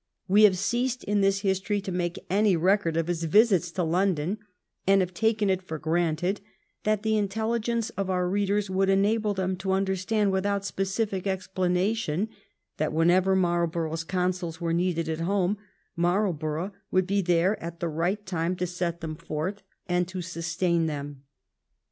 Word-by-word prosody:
We 205 +3 +7
have 190 -3 +4
ceased 245 +6 -1
in 205 0 +1
this 195 0 +2
history 195 +1 0
to 195 -1 -5
make 175 -1 -2
any 200 +1 +3
record 180 -1 +2
of 165 - +1
his 170 -1 -2
visits 190 0 +4
to 180 - 0
London^ 180 +2 0 0.5
and 195 0 +6
have 185 -1 -1
taken 220 +2 +1
it 190 -1 +1
for 160 -4 -6
granted 170 +4 0 0.4
that 215 -1 +1
the 220 0 +2
in 205 -1 +1
telligence 225 +2 -1
of 195 -1 -2
our 180 -1 +1
readers 200 +2 +1
would 190 +1 +1
enable 205 +2 +2
them 190 0 -1
to 190 +1 -1
under 190 0 +1
stand 205 +2 +1
without 200 +1 0
specific 195 0 -2
explanation 190 0 0 0.5
that 155 0 -1
whenever 180 +4 +4
Marl 175 -2 +2
borough's 165 0 -3
counsels 180 -2 -2
were 165 -1 -1
needed 170 -1 0
at 160 0 -2
home 195 +3 0 0.4
Marlborough 175 -1 0 0.2
would 185 0 +2
be 200 +1 +1
there 180 +3 +2
at 170 0 -6
the 170 - -1
right 175 +6 -1
time 175 -1 -1
to 180 - -2
set 175 -1 -3
them 160 -1 -4
forth 170 +5 -4 0.3
and 180 -1 +1
to 185 -1 -5
sustain 170 0 0
them. 145 -2 -6
185 Hz, 170 wpm, -27 LUFS, 170-200 Hz, 0.5 s, We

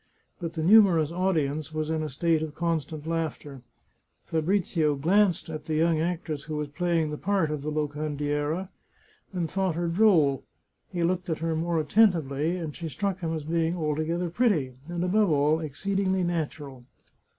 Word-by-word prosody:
But 170 -2 -4
the 160 -2 -3
numerous 175 -5 +6
audience 160 -5 0
was 155 0 -1
in 160 -1 0
a 155 - -3
state 160 +3 +1
of 155 -2 -5
constant 160 -2 -2
laughter. 160 -4 -3 0.6
Fabrizio 160 -2 +1
glanced 180 +5 +2
at 155 -1 -6
the 155 - -2
young 160 0 +2
actress 160 -3 -3
who 155 -1 -4
was 150 -1 -3
playing 165 0 0
the 150 - -5
part 190 -5 +1
of 150 -2 -3
the 150 - -3
Locandiera, 150 +3 -2 0.6
and 175 -4 -2
thought 190 0 -1
her 170 +1 -1
droll; 165 - +3 0.5
he 175 -2 -1
looked 180 +1 0
at 160 - 0
her 165 0 -1
more 165 +1 0
attentively, 160 -3 +2
and 160 -4 -5
she 165 -2 -5
struck 190 +6 -2
him 165 -3 -3
as 160 -2 -3
being 165 +2 0
altogether 160 +2 -1
pretty, 170 - +1
and, 175 0 -3
above 200 +2 +3
all, 150 +1 +3
exceedingly 190 +5 -1
natural. 150 -6 -3
160 Hz, 165 wpm, -27 LUFS, 150-175 Hz, 0.6 s, numerous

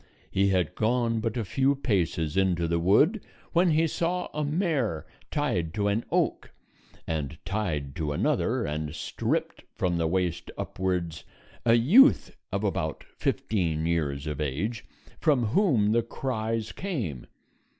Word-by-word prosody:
He 100 +1 +3
had 90 -4 +1
gone 115 0 +1
but 115 +1 -2
a 115 - -1
few 135 +9 +2
paces 90 - 0
into 90 -3 +2
the 85 0 +1
wood 145 - +4 0.3
when 175 +1 +4
he 160 +1 +3
saw 175 +3 -1
a 150 - -1
mare 145 - 0 0.2
tied 95 - -1
to 105 -1 +1
an 105 +3 0
oak, - - 0 0.6
and 75 -2 -3
tied 80 -10 -2
to 75 -2 -1
another, 70 - +1
and 75 +1 -3
stripped - - -2
from 90 -2 0
the 80 - +1
waist 90 0 -1
upwards, 90 -4 -2 0.4
a 115 - +7
youth 190 - +5 0.2
of - - -1
about - - -2
fifteen 105 - -1
years 75 -4 -1
of 75 -1 -3
age, 85 - -2 0.4
from 140 -5 +3
whom 115 - +3
the 115 +1 +3
cries 115 -2 -3
came. 120 - -4
105 Hz, 140 wpm, -27 LUFS, 85-130 Hz, 0.6 s, a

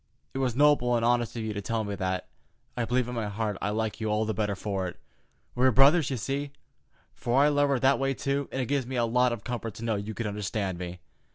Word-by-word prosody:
It 135 - -3
was 125 -3 0
noble 140 -4 +4
and 115 -1 +1
honest 120 -1 +1
of 115 - -3
you 110 -1 -3
to 105 - -4
tell 115 +2 -1
me 100 -1 -4
that. 95 -1 -2 0.5
I 120 - 0
believe 125 +1 +1
in 125 - -5
my 115 -3 -2
heart 105 0 -2
I - - 0
like 110 +1 -2
you 110 - -1
all 105 +1 +1
the 110 - -1
better 105 -1 -1
for 95 -1 -2
it. 90 - -8 0.6
We 125 - 0
are - - +5
brothers, 140 +5 +5
you 130 - -2
see, 140 +5 -3 0.6
for 120 +3 0
I 150 - +5
love 145 -1 +2
her 140 - +2
that 135 +1 +4
way, 135 0 0
too, 140 +1 -1
and 135 - -3
it - - -2
gives 135 -1 -1
me 130 - -4
a 120 -1 +2
lot 125 +2 +3
of 115 -4 -4
comfort 115 -3 -4
to 115 - -8
know 115 -2 0
you 105 +2 -5
can 115 - -3
understand 100 -3 -2
me. 90 0 -6
115 Hz, 265 wpm, -28 LUFS, 105-130 Hz, 0.6 s, are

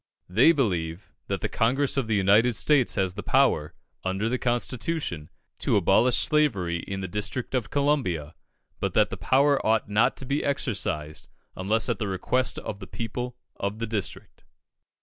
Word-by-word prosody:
They 115 - +5
believe 90 - -2 0.2
that - - -2
the - - 0
Congress 130 +5 +1
of 135 -5 0
the 110 - +1
United 105 +5 +4
States 145 -2 +3
has 95 -2 0
the 105 - -6
power, 130 - +2 0.3
under 95 +4 -1
the 125 +1 -1
Constitution, 120 - -2 0.3
to - - +1
abolish 100 +6 +4
slavery 100 - +1
in 95 +3 -5
the 95 - -3
district 105 +8 -3
of 125 -5 -1
Columbia; 130 - 0 0.5
but - - -2
that - - +3
the - - -3
power 140 +1 +2
ought 110 -1 +1
not 105 +3 +2
to 135 - -5
be 140 +3 -1
exercised, 90 - -2 0.3
unless 105 +4 +1
at 120 -5 -1
the 105 - -2
request 110 +7 0
of 100 - -6
the 95 - -9
people 125 +4 -5 0.2
of 100 +2 -3
the 115 - -2
district. 110 -3 -5
110 Hz, 170 wpm, -26 LUFS, 95-130 Hz, 0.5 s, They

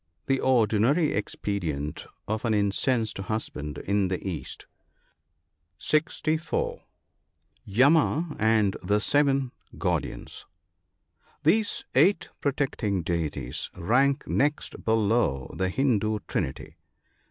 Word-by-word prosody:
— - - -49
The 135 -1 +1
ordinary 125 +5 +3
expedient 85 -8 -3 0.2
of 110 +1 -2
an 115 -3 +1
incensed 110 +2 +1
husband 90 -8 -4
in 100 +2 0
the 90 -1 -2
East. 90 -5 -5 1.1
(64.) 165 - 0 0.8
Yama 150 - +3
and 110 -2 +3
the 105 +3 +1
seven 140 +1 +2 0.3
guardians. - - -3 0.5
— - - -38
These 205 +8 +2
eight 190 -3 +3
protecting 125 - -1
deities 75 -7 -2
rank 135 - +2
next 145 +2 0
below 110 - +1
the 95 0 0
Hindoo 110 -3 +1
Trinity. 65 - -3
110 Hz, 95 wpm, -27 LUFS, 95-140 Hz, 1.1 s, ordinary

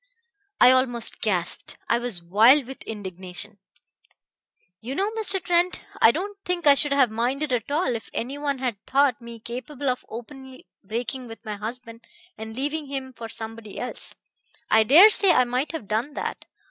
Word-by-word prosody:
"I 245 - +8
almost 255 -3 +1
gasped. 180 -5 -2
I 235 - +2
was 235 -8 -3
wild 225 +10 +5
with 265 +2 -10
indignation. 195 0 -4 1.2
You 255 +4 -6
know, 400 +5 0
Mr. 425 -4 +2
Trent, 355 0 +1 0.2
I - - +8
don't 395 - -3
think 355 -2 -2
I 285 - +8
should 285 +1 +1
have 270 -5 +3
minded 255 +5 -1
at 240 0 -2
all 285 -4 0
if 225 - -7
any 270 +5 -4
one 285 -2 -1
had 245 -6 -4
thought 275 -3 +2
me 235 -1 -10
capable 260 +5 -5
of 250 - -2
openly 260 +3 -10 0.2
breaking 240 +5 -4
with 225 -2 -12
my 210 -1 -4
husband 230 +2 -7 0.3
and 220 0 -8
leaving 295 +2 -3
him 265 -1 -5
for 230 -2 -8
somebody 225 -2 -8
else. 250 - -5 0.6
I 220 - +6
dare 325 - +8
say 390 -4 +6
I 255 - +5
might 250 +4 -2
have 320 -11 -6
done 230 +8 -2
that. - - -5
250 Hz, 170 wpm, -24 LUFS, 225-285 Hz, 1.2 s, I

